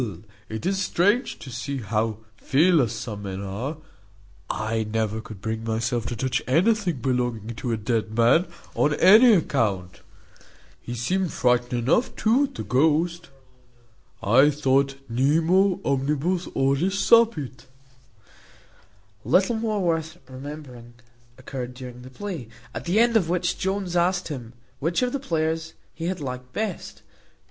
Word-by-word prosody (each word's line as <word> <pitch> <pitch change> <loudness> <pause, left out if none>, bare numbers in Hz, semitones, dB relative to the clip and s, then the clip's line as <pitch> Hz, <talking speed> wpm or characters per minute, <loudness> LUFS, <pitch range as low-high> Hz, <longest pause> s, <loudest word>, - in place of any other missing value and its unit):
it 110 +6 -5
is 195 +1 0
strange 205 +7 +1
to 130 - -10
see 135 +4 -4
how 110 -1 -1 0.2
fearless 140 - +3
some 105 -4 -6
men 95 -1 -5
are: 105 +10 -4 0.7
I 110 +1 -1
never 110 0 -2
could 110 -3 -11
bring 110 +1 -3
myself 115 +1 -1
to 120 - -3
touch 125 +2 -1
anything 175 - +2
belonging 120 -3 -1
to 120 - -3
a 115 - 0
dead 110 0 -2
man, 120 +10 +4 0.3
on 150 0 +2
any 220 +8 +7
account. 105 - 0 0.8
He 120 - -6
seemed 180 +10 -1
frightened 125 0 +1
enough 225 - +2
too 240 +6 +3
at 275 -1 -11
the - - -4
ghost, 160 +6 +1 0.9
I 130 +8 +5
thought. 135 -1 +1
Nemo 165 +10 +2
omnibus 150 +6 0
horis 140 +8 0
sapit." 185 - +3 1.6
Little 195 +5 +3
more 220 -2 -1
worth 165 -1 -1
remembering 130 -3 -9 0.4
occurred 130 -1 -6
during 125 -1 -9
the 130 - -11
play, 165 - -6 0.3
at - - -6
the 180 +5 +2
end 235 0 +4
of 185 -7 +3
which 180 0 0
Jones 190 -2 -2
asked 175 +1 +1
him, 125 -6 -7 0.3
"Which 170 - 0
of 250 - -1
the 280 - -1
players 160 -7 -2 0.2
he 165 - -6
had 185 0 -2
liked 125 -2 -6
best?" 210 -4 -4
140 Hz, 140 wpm, -24 LUFS, 120-180 Hz, 1.6 s, any